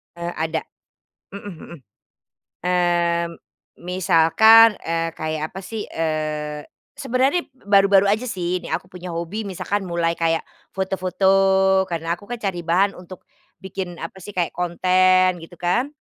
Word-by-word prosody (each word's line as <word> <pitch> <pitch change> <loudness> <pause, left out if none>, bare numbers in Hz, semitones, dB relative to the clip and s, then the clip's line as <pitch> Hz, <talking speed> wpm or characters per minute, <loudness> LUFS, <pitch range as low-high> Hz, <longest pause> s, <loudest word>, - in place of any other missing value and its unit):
Eee, 170 0 -4
ada, 160 0 -2 0.7
mhm 200 +1 -10
mhm, 160 - -13 1.0
mmm, 175 -1 +1 0.5
misalkan, 190 +5 +5
eee, 165 0 -1
kayak 155 0 -3
apa 190 - -9
sih, 210 +3 -6
eee, 155 -2 -3 0.3
sebenarnya 270 +4 +1 0.2
baru-baru 195 -1 +5
aja 215 +3 +1
sih 180 -6 -2
ini - - -8
aku - - -2
punya 180 -1 -9
hobi 170 +6 -4
misalkan 200 +1 -3
mulai 170 -1 -1
kayak 165 -1 0 0.2
foto-foto, 190 0 +2
karena 165 0 -2
aku 175 - -15
kan 245 - -3
cari 185 -4 -3
bahan 185 +4 +2
untuk 180 0 -12 0.3
bikin 185 -1 -6
apa 165 - -7
sih, 205 - -8
kayak 180 -4 -2
konten 185 +1 +2
gitu 170 +1 -13
kan. 240 +11 0
180 Hz, 135 wpm, -22 LUFS, 170-195 Hz, 1.0 s, misalkan